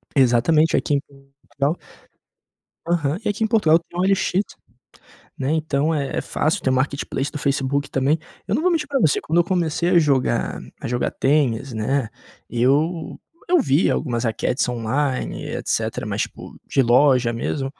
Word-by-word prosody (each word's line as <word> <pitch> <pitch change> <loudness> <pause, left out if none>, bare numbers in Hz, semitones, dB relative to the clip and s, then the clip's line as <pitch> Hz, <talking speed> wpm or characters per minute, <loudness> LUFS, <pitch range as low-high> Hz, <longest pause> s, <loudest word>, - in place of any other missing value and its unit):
Exatamente 135 +5 +4
aqui 145 - 0
em 140 - +2 0.4
Portugal. 145 +5 -2 1.1
Aham, 165 -2 0
e 210 - 0
aqui 215 +2 -1
em - - 0
Portugal 170 -8 +4
tem 170 +1 -13
OLX, 190 +1 +2 1.0
né? 135 +1 -1
Então 155 0 0
é 140 -3 -2
é - - +1
fácil, 165 +5 -1
tem 130 - +1
o 130 - +2
marketplace 140 +1 -2
do 150 - -4
Facebook 140 0 -1
também. 140 +4 +1 0.3
Eu - - -1
não - - +1
vou 365 - +3
mentir 320 -4 0
pra 275 -1 -1
você. 155 -9 +3
Quando 165 +3 0
eu - - +2
comecei 170 -2 0
a 175 - +5
jogar 140 -5 +1 0.2
a - - -5
jogar 120 +1 -1
tênis, 135 -3 +1
né, 115 +3 -1 0.4
eu 145 +8 0 0.3
eu 360 - +5
vi 150 - +2
algumas 120 -4 -1
raquetes 115 +4 0
online 125 +3 -2
etcetera, - - -2
mas - - -1
tipo - - -8
de 135 - +2
loja 125 0 +4
mesmo 135 +4 -2
145 Hz, 165 wpm, -22 LUFS, 130-165 Hz, 1.1 s, a